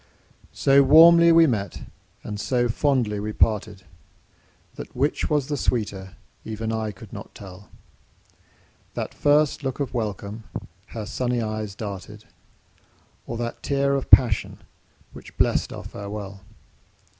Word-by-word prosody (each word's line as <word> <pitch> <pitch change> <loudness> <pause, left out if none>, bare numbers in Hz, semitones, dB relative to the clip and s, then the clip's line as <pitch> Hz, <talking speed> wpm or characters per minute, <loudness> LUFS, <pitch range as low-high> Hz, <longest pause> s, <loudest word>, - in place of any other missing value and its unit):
So 140 0 +5
warmly 170 +4 +7
we 165 0 +7
met 105 - -2 0.4
and 105 -1 -6
so 120 +1 0
fondly 120 -5 0
we 105 +1 -4
parted, 105 -3 0 0.9
That - - -10
which 140 +4 0
was 150 -3 +1
the 145 +1 -3
sweeter 100 -7 -2 0.3
even 110 0 -4
I 110 -1 -2
could 95 - -14
not - - -10
tell, 95 0 -12 1.3
That - - -4
first 145 0 +2
look 135 0 -3
of 140 -4 -3
welcome 105 -1 -4 0.4
her 110 -2 -7
sunny 125 +2 -2
eyes 110 -2 -4
darted, 105 +1 -8 1.0
Or 115 - -4
that 120 0 -5
tear 140 0 0
of 135 -1 -2
passion, 115 -6 +4 0.5
which - - -13
blest - - +1
our - - -7
farewell. 100 -1 -8
115 Hz, 130 wpm, -24 LUFS, 105-135 Hz, 1.3 s, warmly